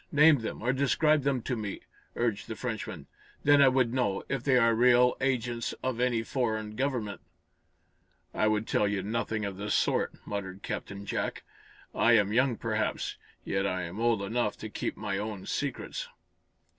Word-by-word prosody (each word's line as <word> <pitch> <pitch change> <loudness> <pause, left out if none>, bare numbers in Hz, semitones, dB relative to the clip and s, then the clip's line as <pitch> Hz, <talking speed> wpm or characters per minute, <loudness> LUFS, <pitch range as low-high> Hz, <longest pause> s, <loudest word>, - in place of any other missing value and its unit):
Name 150 0 +6
them, 110 -1 -5
or 125 +2 +2
describe 150 +3 +3
them 135 -3 0
to 125 - -1
me," 105 -3 -5 0.3
urged 115 -4 -1
the - - -5
Frenchman. - - -5 0.4
"Then 145 0 +6
I 140 - +8
would 130 -2 +2
know, 125 -7 0
if 135 -3 -2
they 135 -2 +4
are 115 -2 +4
real 125 +1 +5
agents 120 -3 -1
of 130 -2 -1
any 120 -2 +1
foreign 110 -4 -2
government." 125 -6 -2 1.1
"I 110 - +2
would 110 0 +1
tell 105 - +2
you 100 -2 -1
nothing 110 0 -2
of 100 -2 -5
the 105 +1 -4
sort," - - +1
muttered 100 -1 -5
Captain 100 -2 -5
Jack. - - -3 0.5
"I 120 - +4
am 105 -2 +4
young, 125 0 +3
perhaps, 110 -1 -2 0.3
yet 95 0 0
I'm 90 +1 -3
old 115 -3 +2
enough 105 +1 -1
to 110 - -5
keep - - -4
my 100 -1 -2
own 105 -2 -5
secrets." - - -3
115 Hz, 170 wpm, -29 LUFS, 105-125 Hz, 1.1 s, I